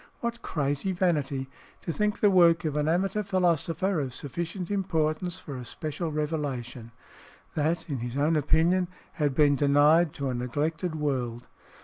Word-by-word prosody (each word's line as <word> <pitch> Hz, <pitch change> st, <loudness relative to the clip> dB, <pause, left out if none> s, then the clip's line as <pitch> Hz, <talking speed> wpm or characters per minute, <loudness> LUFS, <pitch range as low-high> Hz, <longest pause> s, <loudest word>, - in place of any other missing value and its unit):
What 235 Hz, 0 st, -3 dB
crazy 145 Hz, +5 st, -1 dB
vanity, 145 Hz, -7 st, 0 dB, 0.4 s
to 165 Hz, -, -3 dB
think 210 Hz, +2 st, -1 dB
the 205 Hz, -, +5 dB
work 170 Hz, -2 st, +5 dB
of 150 Hz, -2 st, -1 dB
an 150 Hz, 0 st, +1 dB
amateur 190 Hz, +5 st, +1 dB
philosopher 185 Hz, -1 st, +1 dB
of 130 Hz, -3 st, -3 dB
sufficient 170 Hz, +7 st, -4 dB
importance 175 Hz, -2 st, 0 dB
for 150 Hz, -6 st, -8 dB
a 125 Hz, -, -6 dB
special 155 Hz, +6 st, -4 dB
revelation, 140 Hz, -6 st, -3 dB, 0.6 s
that 160 Hz, +2 st, 0 dB
(in 140 Hz, -5 st, -3 dB
his 120 Hz, +2 st, -4 dB
own 150 Hz, +3 st, +2 dB
opinion) 165 Hz, +5 st, +3 dB, 0.3 s
had 145 Hz, -3 st, +1 dB
been 145 Hz, -1 st, +5 dB
denied 145 Hz, +3 st, +4 dB
to 140 Hz, -1 st, -3 dB
a -, -, -1 dB
neglected 150 Hz, +7 st, -2 dB
world! 125 Hz, -6 st, -2 dB
155 Hz, 150 wpm, -27 LUFS, 140-175 Hz, 0.6 s, the